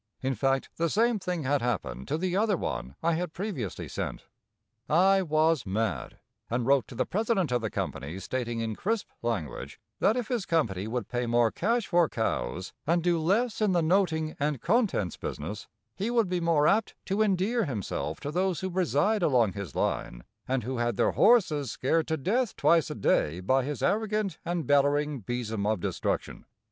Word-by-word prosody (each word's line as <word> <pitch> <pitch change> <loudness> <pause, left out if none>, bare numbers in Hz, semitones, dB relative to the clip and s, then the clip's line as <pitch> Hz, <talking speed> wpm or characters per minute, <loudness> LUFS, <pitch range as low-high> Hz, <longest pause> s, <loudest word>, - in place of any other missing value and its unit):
In 135 +1 +1
fact 135 +3 0
the 170 0 +1
same 225 +4 +2
thing 180 -4 -3
had 140 +1 +1
happened 95 - -2
to - - 0
the 180 +1 -1
other 205 -1 +2
one 65 - -4
I 170 - +3
had 170 0 -2
previously 170 - -4
sent. - - -4 0.7
I 190 +4 +5
was 155 -2 +2
mad, 110 +3 -2 0.3
and 120 0 -1
wrote 135 -1 +3
to 125 - -10
the - - 0
president 205 - 0
of 120 -1 +1
the 110 - -2
company 80 -2 -4
stating 120 +2 -3
in 110 -1 -2
crisp 220 - -2
language 110 -11 -4 0.2
that 220 +4 +3
if 245 -3 -2
his 240 -6 -2
company 105 - 0
would 115 -2 -3
pay 120 0 -2
more 120 -1 +3
cash 230 +3 0
for 175 -4 +3
cows 90 - -2
and 170 +1 +2
do 175 -1 +2
less 210 +9 +1
in 210 -3 +3
the 170 -2 +2
noting 160 -3 +1
and 145 -2 0
contents 185 - +1
business, 90 +9 -5 0.3
he 205 +4 -2
would 230 -5 +2
be 180 -1 0
more 160 -3 +3
apt 210 +4 +2
to 195 +3 0
endear 210 +3 +2
himself 115 - -3
to 145 - -4
those 185 +2 0
who 190 0 -3
reside 185 +3 +1
along 120 - +3
his 100 -8 -7
line - - -2 0.2
and 130 -2 0
who 130 +3 -3
had 120 0 0
their - - +3
horses 160 - +4
scared 160 +8 0
to 160 - 0
death 215 - 0
twice 165 -4 +3
a - - -4
day 80 +4 +1
by 130 +8 +2
his 145 +2 -4
arrogant 215 -1 0
and 170 -1 -2
bellering 145 -2 +2
besom 110 -3 -2
of 110 -2 +1
destruction. - - -3
155 Hz, 185 wpm, -28 LUFS, 120-190 Hz, 0.7 s, I